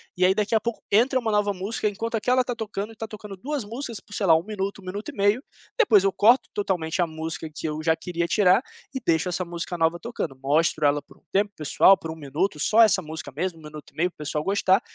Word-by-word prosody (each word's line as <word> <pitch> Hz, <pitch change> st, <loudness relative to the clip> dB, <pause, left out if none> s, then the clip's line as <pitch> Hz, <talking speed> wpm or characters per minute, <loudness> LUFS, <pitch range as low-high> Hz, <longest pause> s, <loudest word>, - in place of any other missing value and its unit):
E 185 Hz, -, 0 dB
aí, 185 Hz, +1 st, +5 dB
daqui 210 Hz, +2 st, 0 dB
a -, -, +5 dB
pouco, 235 Hz, +1 st, -4 dB
entra 250 Hz, +5 st, +3 dB
uma 225 Hz, -3 st, -1 dB
nova 210 Hz, -1 st, +2 dB
música 200 Hz, +3 st, -2 dB
enquanto 225 Hz, +3 st, -4 dB
aquela 250 Hz, +4 st, +2 dB
está 245 Hz, -1 st, -3 dB
tocando, 215 Hz, -1 st, -5 dB
e -, -, -12 dB
estão 225 Hz, 0 st, -7 dB
tocando 210 Hz, -2 st, -9 dB
2 270 Hz, +4 st, -4 dB
músicas 230 Hz, 0 st, -5 dB
por, 205 Hz, -, -15 dB
sei 205 Hz, -, -1 dB
lá, 165 Hz, -, +6 dB
1 160 Hz, -, -3 dB
minuto, 200 Hz, -1 st, -4 dB
1 -, -, -16 dB
minuto 200 Hz, +3 st, -5 dB
e -, -, -8 dB
meio. 205 Hz, +6 st, +2 dB, 0.3 s
Depois 215 Hz, -, +5 dB
eu 195 Hz, -, +2 dB
corto 240 Hz, +4 st, +4 dB
totalmente 180 Hz, -4 st, -1 dB
a 175 Hz, -, +2 dB
música 160 Hz, 0 st, -5 dB
que 155 Hz, -, -4 dB
eu 155 Hz, 0 st, -3 dB
já 160 Hz, 0 st, +4 dB
queria 170 Hz, 0 st, -3 dB
tirar 190 Hz, +4 st, +4 dB, 0.3 s
e 265 Hz, -, -2 dB
deixo 165 Hz, +1 st, +2 dB
essa 180 Hz, +1 st, -1 dB
música 170 Hz, 0 st, -5 dB
nova 165 Hz, +1 st, +1 dB
tocando. 230 Hz, -, -4 dB
Mostro 150 Hz, +2 st, +2 dB
ela 145 Hz, 0 st, +3 dB
por 145 Hz, -, -20 dB
um -, -, -30 dB
tempo 205 Hz, +1 st, +2 dB
para 200 Hz, -, -49 dB
o -, -, -65 dB
pessoal, 195 Hz, +7 st, +6 dB
por 165 Hz, -, -8 dB
1 160 Hz, -, -5 dB
minuto, 155 Hz, +4 st, -2 dB
só 215 Hz, +10 st, +4 dB
essa 215 Hz, -4 st, +5 dB
música 160 Hz, -4 st, -7 dB
mesmo, 170 Hz, +1 st, -3 dB
1 -, -, -16 dB
minuto 150 Hz, 0 st, -11 dB
e -, -, -35 dB
meio, 175 Hz, +3 st, +2 dB
para -, -, -29 dB
o -, -, -79 dB
pessoal 150 Hz, 0 st, -1 dB
gostar. 195 Hz, +1 st, +3 dB
195 Hz, 270 wpm, -25 LUFS, 165-215 Hz, 0.3 s, lá